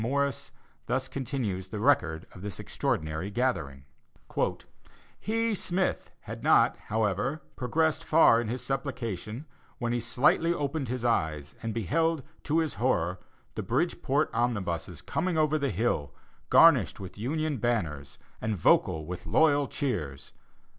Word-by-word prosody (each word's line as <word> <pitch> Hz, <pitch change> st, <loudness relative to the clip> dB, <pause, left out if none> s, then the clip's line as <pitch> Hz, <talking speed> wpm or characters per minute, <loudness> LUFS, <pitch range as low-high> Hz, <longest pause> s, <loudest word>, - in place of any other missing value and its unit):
Morris, 140 Hz, +4 st, -1 dB, 0.4 s
thus -, -, 0 dB
continues 115 Hz, -9 st, -3 dB
the 105 Hz, +2 st, -5 dB
record 90 Hz, -, +2 dB
of 90 Hz, -, -12 dB
this 100 Hz, -2 st, -5 dB
extraordinary 80 Hz, +4 st, -2 dB
gathering: 85 Hz, -, -1 dB, 1.4 s
"He 225 Hz, +1 st, 0 dB
(Smith) 185 Hz, -1 st, 0 dB
had -, -, -8 dB
not, -, -, +5 dB
however, 110 Hz, -, 0 dB
progressed 155 Hz, +5 st, 0 dB
far 155 Hz, -7 st, +5 dB
in 120 Hz, -, -4 dB
his 125 Hz, +2 st, -4 dB
supplication, 125 Hz, -, -4 dB, 0.3 s
when 120 Hz, -1 st, -1 dB
he 120 Hz, -, +1 dB
slightly 125 Hz, +8 st, +2 dB
opened 145 Hz, -1 st, -2 dB
his 120 Hz, 0 st, -3 dB
eyes, 80 Hz, -10 st, 0 dB
and 115 Hz, -, -3 dB
beheld, 155 Hz, -, 0 dB, 0.2 s
to 150 Hz, +2 st, +1 dB
his 160 Hz, -3 st, +1 dB
horror, 90 Hz, -8 st, +1 dB, 0.3 s
the -, -, -3 dB
Bridgeport 145 Hz, +1 st, 0 dB
omnibuses 100 Hz, -8 st, -2 dB
coming 175 Hz, 0 st, -1 dB
over 155 Hz, 0 st, +2 dB
the 140 Hz, -1 st, 0 dB
hill, 105 Hz, -, -1 dB, 0.3 s
garnished 140 Hz, -, +6 dB
with 95 Hz, -3 st, -8 dB
Union 150 Hz, +5 st, -1 dB
banners, 80 Hz, -, -2 dB, 0.2 s
and 110 Hz, -1 st, -1 dB
vocal 80 Hz, -1 st, +3 dB
with 90 Hz, +2 st, -7 dB
loyal 145 Hz, -3 st, +4 dB
cheers. 75 Hz, -, -3 dB
120 Hz, 135 wpm, -28 LUFS, 95-145 Hz, 1.4 s, garnished